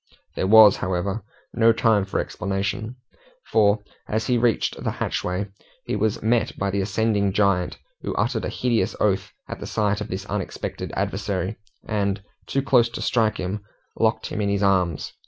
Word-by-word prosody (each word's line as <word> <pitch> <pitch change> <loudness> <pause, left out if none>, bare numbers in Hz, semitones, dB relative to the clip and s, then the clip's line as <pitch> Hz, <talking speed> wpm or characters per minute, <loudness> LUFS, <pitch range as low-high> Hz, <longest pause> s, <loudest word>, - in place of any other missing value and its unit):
There 95 - 0
was, 110 -1 +8
however, 95 +3 -2 0.3
no 115 -1 +5
time 110 -3 +3
for 100 - -2
explanation, 100 +4 -3 0.6
for, 105 -1 +4 0.3
as 110 +1 0
he 125 - +2
reached 120 -2 +1
the - - 0
hatchway, 90 +3 -2 0.4
he - - -2
was 105 0 0
met 115 0 +1
by 100 0 -1
the 100 0 0
ascending 100 0 +1
giant, 100 -3 +1 0.2
who - - -4
uttered - - 0
a - - -2
hideous 120 -3 0
oath 100 -3 +1 0.2
at - - -6
the - - -6
sight 105 -1 0
of 105 - -3
this 95 0 -5
unexpected 105 -3 -4
adversary, 100 0 -2 0.3
and, 100 -2 -1 0.2
too 135 - 0
close 125 -4 +4
to 115 - -7
strike 110 -3 +2
him, 100 +3 -3 0.3
locked - - +1
him 105 - -3
in 100 - +1
his 100 0 0
arms. 90 -5 +1
105 Hz, 170 wpm, -24 LUFS, 95-110 Hz, 0.6 s, was